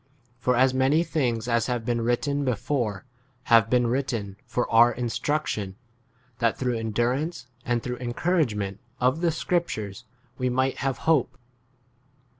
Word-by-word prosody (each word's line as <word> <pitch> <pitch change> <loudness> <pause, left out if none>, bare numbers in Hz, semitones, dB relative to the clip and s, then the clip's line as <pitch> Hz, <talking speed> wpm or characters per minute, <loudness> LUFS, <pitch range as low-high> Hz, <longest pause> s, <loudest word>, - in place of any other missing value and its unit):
For 125 0 +2
as 130 +1 +4
many 135 +5 +3
things 120 -9 -1
as 115 -1 +1
have 120 -3 -2
been 120 -1 0
written 140 +5 0
before 120 -4 -1 0.5
have 115 -2 +6
been 125 0 +3
written 125 -2 0
w - - -16
for 125 - -1
our 120 +1 +7
instruction, 120 -4 -2 0.6
that 115 -1 +1
through 125 -3 -1
endurance 125 +7 -1 0.2
and 120 -1 -1
through 125 0 -3
* - - -15
encouragement 120 - 0 0.2
of 130 +6 +2
the 175 - +3
scriptures 125 - -2 0.3
5 - - -29
we 125 0 +1
might 130 +2 0
have 135 -3 -1
hope. 135 -6 +2
125 Hz, 150 wpm, -26 LUFS, 115-135 Hz, 0.6 s, our